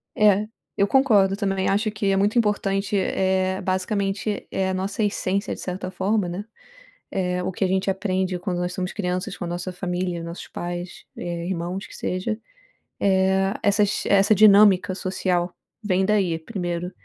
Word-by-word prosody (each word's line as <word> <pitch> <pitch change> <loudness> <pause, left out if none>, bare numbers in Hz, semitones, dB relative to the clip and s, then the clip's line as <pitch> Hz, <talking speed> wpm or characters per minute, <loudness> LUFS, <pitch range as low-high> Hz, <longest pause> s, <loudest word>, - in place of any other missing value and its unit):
É, 210 0 +4 0.3
eu 200 - +3
concordo 210 -8 +4
também, 195 -2 -1
acho 210 +3 +1
que 205 -2 0
é - - +2
muito 205 +4 +2
importante, 205 -2 +1
eh, 190 0 +1
basicamente 195 +2 -1
é 190 -1 0
a - - -1
nossa 195 +3 -2
essência, 200 -1 -1
de - - -13
certa 185 0 -4
forma, 190 0 0
né, 190 +4 -5 0.7
eh, 180 -1 -1
o 185 - -2
que 190 - -2
a 185 - +1
gente 190 +1 +1
aprende 185 -1 -1
quando 180 -1 -3
nós 180 0 -2
somos 185 0 -3
crianças 180 -1 -3
com 180 - -5
a - - -4
nossa 175 +1 -4
família, 180 -1 -3
nossos 170 +1 -7
pais, 175 +1 -6
eh, 170 0 -4
irmãos, 180 +2 -3
que - - -11
seja, 210 +4 -2 0.6
eh, 190 0 +2
essas 205 0 +2
essa 200 +1 +4
dinâmica 200 -2 +6
social 180 -2 -1 0.3
vem 190 -1 +2
daí 190 -6 +2
primeiro. 175 -1 -4
190 Hz, 165 wpm, -23 LUFS, 180-200 Hz, 0.7 s, dinâmica